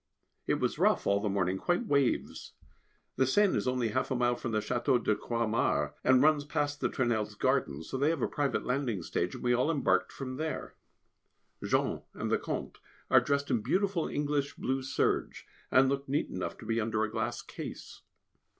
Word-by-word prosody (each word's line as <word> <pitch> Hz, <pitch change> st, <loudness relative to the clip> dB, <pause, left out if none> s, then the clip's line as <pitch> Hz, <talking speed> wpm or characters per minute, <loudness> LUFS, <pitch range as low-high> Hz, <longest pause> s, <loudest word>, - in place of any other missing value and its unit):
It -, -, +2 dB
was -, -, -1 dB
rough -, -, +3 dB
all 100 Hz, 0 st, +3 dB
the 105 Hz, 0 st, -1 dB
morning, 95 Hz, -1 st, 0 dB
quite 175 Hz, -, 0 dB
waves. 140 Hz, -, 0 dB, 0.6 s
The 130 Hz, -, +3 dB
Seine 205 Hz, +8 st, +3 dB
is -, -, -1 dB
only 125 Hz, -2 st, +1 dB
half 130 Hz, +4 st, -1 dB
a 130 Hz, -, 0 dB
mile 120 Hz, 0 st, +2 dB
from 120 Hz, -, -4 dB
the 110 Hz, -, 0 dB
Château 125 Hz, +4 st, +1 dB
de 105 Hz, -, +2 dB
Croixmare, 115 Hz, 0 st, 0 dB
and 130 Hz, +1 st, +5 dB
runs 150 Hz, -1 st, +4 dB
past 145 Hz, 0 st, -2 dB
the -, -, +1 dB
Tournelles' 120 Hz, -5 st, -1 dB
garden, 70 Hz, +3 st, 0 dB
so 130 Hz, +11 st, -5 dB
they 145 Hz, +3 st, +3 dB
have 160 Hz, -6 st, -1 dB
a -, -, +2 dB
private 145 Hz, -2 st, -1 dB
landing 125 Hz, -8 st, -1 dB
stage, 85 Hz, +2 st, -2 dB
and -, -, -8 dB
we 125 Hz, 0 st, +3 dB
all 125 Hz, +5 st, +2 dB
embarked 145 Hz, -5 st, +1 dB
from 130 Hz, -1 st, -6 dB
there. 155 Hz, +1 st, -4 dB, 0.9 s
Jean -, -, 0 dB
and -, -, -3 dB
the -, -, +3 dB
Comte -, -, -5 dB, 0.3 s
are -, -, +8 dB
dressed 140 Hz, 0 st, 0 dB
in 120 Hz, -4 st, +2 dB
beautiful 190 Hz, -, 0 dB
English 145 Hz, -1 st, -1 dB
blue 135 Hz, +1 st, -1 dB
serges, 130 Hz, 0 st, -1 dB, 0.3 s
and 130 Hz, +1 st, +5 dB
look 140 Hz, 0 st, -2 dB
neat 145 Hz, +2 st, 0 dB
enough 90 Hz, -, -4 dB
to -, -, -11 dB
be 115 Hz, +1 st, 0 dB
under 110 Hz, 0 st, 0 dB
a 110 Hz, -, -2 dB
glass -, -, -2 dB
case. -, -, -8 dB
130 Hz, 195 wpm, -30 LUFS, 115-145 Hz, 0.9 s, are